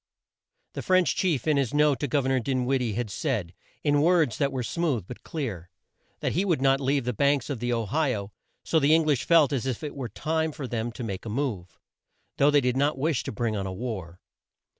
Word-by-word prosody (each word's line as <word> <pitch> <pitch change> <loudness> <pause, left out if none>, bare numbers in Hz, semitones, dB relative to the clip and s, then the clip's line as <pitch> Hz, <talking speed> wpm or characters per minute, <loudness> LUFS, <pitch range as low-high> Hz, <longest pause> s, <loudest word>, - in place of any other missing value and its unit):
The - - -4
French 185 -1 +3
chief 165 -10 0
in 150 -2 +3
his 140 0 0
note 150 -2 +3
to 145 - -1
Gov 140 0 0
er - - +1
nor 130 -1 +2
Din 130 0 -1
wid 135 0 +1
die 115 -4 -1
had 115 -1 -3
said, 105 - -2 0.3
in 145 -1 +3
words 160 -8 +3
that 140 -1 +1
were 130 -2 -2
smooth 140 - -1
but 125 - -9
clear, 105 - -5 0.5
that - - 0
he 180 - +1
would 175 -7 +1
not 135 +1 +3
leave 135 -1 +1
the 125 - -1
banks 140 +3 +1
of 130 - -3
the 120 +1 -1
O 115 -2 0
hi 140 +3 0
o; 100 0 -6 0.3
so 160 - +3
the 150 +2 +5
Eng 165 -1 +3
lish 145 -5 +1
felt 160 -5 +5
as 135 -1 -1
if 130 +1 -3
it 150 - -5
were 130 -4 -5
time 160 +8 -1
for 140 - -6
them 120 -1 -3
to 125 - -6
make 100 -5 -5
a 115 - -6
move, 105 -8 -3 0.6
though 140 - +5
they 145 -1 +4
did 125 0 0
not 145 +2 +1
wish 150 0 0
to - - -3
bring 110 0 -2
on 100 -2 -2
a - - -4
war. 95 -5 -6
135 Hz, 245 wpm, -26 LUFS, 115-150 Hz, 0.6 s, the